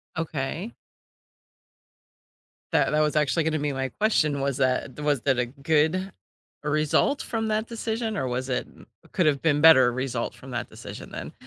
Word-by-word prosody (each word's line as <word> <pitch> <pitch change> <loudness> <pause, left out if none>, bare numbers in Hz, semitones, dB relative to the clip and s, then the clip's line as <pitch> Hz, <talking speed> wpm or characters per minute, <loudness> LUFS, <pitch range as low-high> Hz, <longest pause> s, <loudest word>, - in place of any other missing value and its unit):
Okay. 160 - -4 2.0
That - - +2
that 150 - +2
was 150 0 +1
actually 150 +2 +2
gonna 155 -1 0
be 145 0 -1
my 135 0 -2
question. 150 - +1
Was 140 -1 -1
that 130 0 0
was 145 -4 +1
that 135 -1 +1
a 125 - +2
good 155 +8 0 0.5
result 155 - +1
from 225 -1 -2
that 215 +1 0
decision 225 -1 -3
or 130 - -1
was 130 +1 -3
it 125 - -1 0.5
could 180 - +2
have 140 -2 +2
been 150 -2 +2
better 130 -6 +7
result 125 -2 -3
from 130 0 -12
that 120 0 -4
decision - - -10
then? - - -6
150 Hz, 160 wpm, -25 LUFS, 130-165 Hz, 2.0 s, better